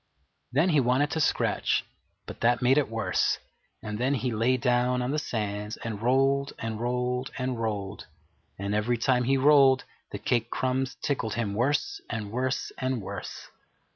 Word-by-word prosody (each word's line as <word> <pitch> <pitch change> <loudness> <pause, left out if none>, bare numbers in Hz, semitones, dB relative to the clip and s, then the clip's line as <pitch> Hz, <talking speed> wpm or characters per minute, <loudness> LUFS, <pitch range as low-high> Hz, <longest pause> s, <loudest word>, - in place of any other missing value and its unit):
Then 150 +8 +3
he 155 -4 +4
wanted 130 +3 +2
to 160 - -1
scratch, 150 - +1 0.4
but - - -9
that 120 +1 +3
made 130 +4 +5
it 145 - -1
worse; 115 0 +1 0.5
and 105 0 -4
then 130 +3 +2
he 125 0 -1
lay 115 +4 +2
down 125 +1 +2
on 125 - -1
the 150 - +1
sands 105 -4 -3
and 110 -3 -5
rolled 135 +3 +2
and 115 -1 -4
rolled 125 +1 -1
and 125 -2 -2
rolled, 105 -3 -3 0.5
and 100 +1 -3
every 110 +3 +1
time 125 +1 +2
he 135 +2 +3
rolled 135 -1 +5 0.3
the - - -5
cake 120 -2 0
crumbs 130 +1 -1
tickled 115 -6 -1
him 110 -3 -1
worse 145 - 0
and 110 -3 -4
worse 130 +2 -1
and 130 -1 -1
worse. 100 -1 -7
125 Hz, 170 wpm, -27 LUFS, 110-130 Hz, 0.5 s, made